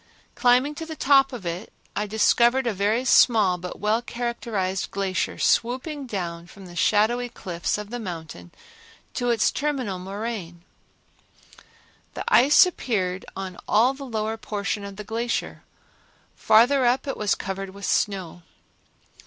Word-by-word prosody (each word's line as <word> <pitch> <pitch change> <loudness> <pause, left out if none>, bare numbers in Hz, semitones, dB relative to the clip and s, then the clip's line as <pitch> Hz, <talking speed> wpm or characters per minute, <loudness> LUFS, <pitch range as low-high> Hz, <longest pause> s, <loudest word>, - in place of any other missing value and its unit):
Climbing 250 +4 +3
to 325 - -5
the 320 - -6
top 270 -2 +4
of 235 -7 -8
it, 170 +5 -5 0.2
I 210 - -1
discovered 235 +4 +3
a 235 - 0
very 210 +6 0
small 210 -8 +4
but 180 +1 -7
well 215 +3 +1
characterized 235 -6 -3
glacier 195 -1 -2
swooping 260 +4 0
down 170 -5 -5
from 195 +1 -13
the 175 -1 -12
shadowy 225 +6 +2
cliffs 175 -6 -3
of 210 0 -8
the 245 - -4
mountain 160 - -7 0.6
to 245 - -1
its 230 -2 +2
terminal 265 -10 -2
moraine. 190 -3 -6 1.5
The - - -4
ice 280 +9 +7
appeared 190 - -2
on 190 -2 -6
all 235 +5 +4
the 275 +1 -9
lower 220 -3 -3
portion 205 -1 -3
of 200 -1 -8
the 210 - -7
glacier; 230 +3 -3 0.7
farther 245 +5 +4
up 245 +2 +2
it 275 - -2
was 210 -2 0
covered 195 0 -5
with 200 +1 -8
snow. 185 -4 -1
215 Hz, 145 wpm, -24 LUFS, 190-245 Hz, 1.5 s, ice